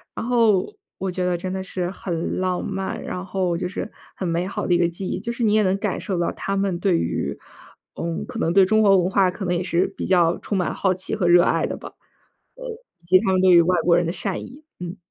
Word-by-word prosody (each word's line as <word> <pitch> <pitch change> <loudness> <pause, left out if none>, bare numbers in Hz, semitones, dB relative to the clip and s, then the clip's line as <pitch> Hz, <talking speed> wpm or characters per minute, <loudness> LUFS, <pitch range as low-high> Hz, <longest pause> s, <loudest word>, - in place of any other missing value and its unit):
然 - - -4
后 230 - +2 0.2
我 190 - -3
觉 180 0 -2
得 180 -1 +1
真 185 +2 -4
的 190 0 -3
是 180 -2 -3
很 175 -4 -3
浪 185 -1 -1
漫， 195 -1 -4
然 180 +1 -5
后 185 -2 -1
就 180 - -2
是 200 - -5 0.2
很 185 - -3
美 170 +1 0
好 200 - -3
的 180 - +3
一 - - +4
个 175 -1 +3
记 180 +3 -4
忆， - - -2
就 225 +4 -4
是 235 0 -3
你 210 -2 +3
也 215 0 +4
能 190 -1 +2
感 - - -2
受 190 -4 -2
到 170 - 0
他 195 - -3
们 195 -3 0
对 185 -2 +2
于， 70 -4 -2 0.6
呃， - - -5 0.2
可 - - -7
能 165 - +1
对 195 0 +6
中 215 +3 +3
国 200 -2 +6
文 180 0 +1
化 190 -1 +3
可 190 +1 -6
能 180 0 0
也 175 - -1
是 175 0 +1
比 - - -3
较 175 -3 +3
充 205 - -3
满 180 - 0
好 190 -2 +1
奇 185 +1 -3
和 185 -4 0
热 175 0 +7
爱 - - +1
的 - - -4
吧。 - - -10 0.6
呃， - - -10 0.3
以 170 - -23
及 185 +2 +5
他 190 - 0
们 185 - +2
对 190 - +5
于 175 -1 +8
外 180 +1 +2
国 170 0 +4
人 175 -1 +1
的 170 - -1
善 190 +1 -3
意， 280 +5 -12 0.2
嗯。 180 +1 -6
185 Hz, 285 characters per minute, -22 LUFS, 175-195 Hz, 0.6 s, 于